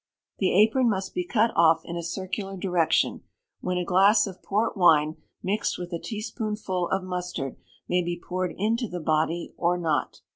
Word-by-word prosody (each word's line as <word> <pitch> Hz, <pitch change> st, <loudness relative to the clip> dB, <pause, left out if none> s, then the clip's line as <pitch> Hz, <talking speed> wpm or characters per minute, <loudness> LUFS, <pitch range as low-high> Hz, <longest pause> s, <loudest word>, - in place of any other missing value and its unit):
The 190 Hz, -, +2 dB
apron 235 Hz, +3 st, +4 dB
must 190 Hz, -3 st, -2 dB
be 360 Hz, -, -1 dB
cut 230 Hz, -8 st, +2 dB
off 165 Hz, -1 st, +4 dB
in 170 Hz, -, -6 dB
a 170 Hz, -, -2 dB
circular 190 Hz, +3 st, -4 dB
direction, 180 Hz, -3 st, +1 dB, 0.4 s
when 180 Hz, 0 st, -2 dB
a 180 Hz, -, -1 dB
glass 195 Hz, +5 st, +5 dB
of 185 Hz, -2 st, -8 dB
port 210 Hz, +3 st, 0 dB
wine, 160 Hz, -5 st, +4 dB, 0.3 s
mixed 200 Hz, +3 st, -1 dB
with 175 Hz, 0 st, -6 dB
a 170 Hz, -, -2 dB
teaspoonful 215 Hz, -4 st, -3 dB
of 190 Hz, 0 st, 0 dB
mustard, 180 Hz, -7 st, -4 dB, 0.3 s
may 180 Hz, 0 st, +2 dB
be 175 Hz, 0 st, -3 dB
poured 185 Hz, 0 st, -3 dB
into 225 Hz, +4 st, 0 dB
the 180 Hz, -2 st, -5 dB
body 160 Hz, +1 st, 0 dB
or 175 Hz, +1 st, +1 dB
not. 160 Hz, -6 st, -1 dB
185 Hz, 175 wpm, -26 LUFS, 170-210 Hz, 0.4 s, glass